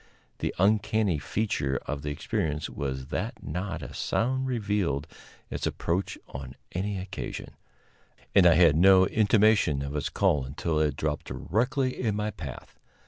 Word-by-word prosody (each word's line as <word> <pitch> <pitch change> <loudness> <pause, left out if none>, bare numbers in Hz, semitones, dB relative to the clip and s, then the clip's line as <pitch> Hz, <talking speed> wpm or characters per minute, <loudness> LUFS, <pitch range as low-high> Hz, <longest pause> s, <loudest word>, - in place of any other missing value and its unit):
The - - -2
uncanny 105 -2 +2
feature 70 -8 -1
of 75 -1 -3
the 75 - -3
experience 75 +1 -2
was 65 -2 -4
that - - -3
not 85 +2 -4
a - - -8
sound 130 +3 0
revealed 105 - 0 0.5
its - - -2
approach 90 +4 -2
on 65 -1 -8 0.2
any 100 +3 -2
occasion, 95 +1 -6 0.8
and 95 -3 +7
I 85 - +6
had 85 -3 +6
no 95 +2 +7
intimation 105 - +3
of 70 +1 -5
its 75 - -1
call 70 -3 +2
until 75 +4 -2
it 75 -3 +1
dropped 75 0 -2
directly 130 - 0
in 110 -4 0
my 105 0 -1
path. 70 - -9
90 Hz, 145 wpm, -28 LUFS, 75-105 Hz, 0.8 s, and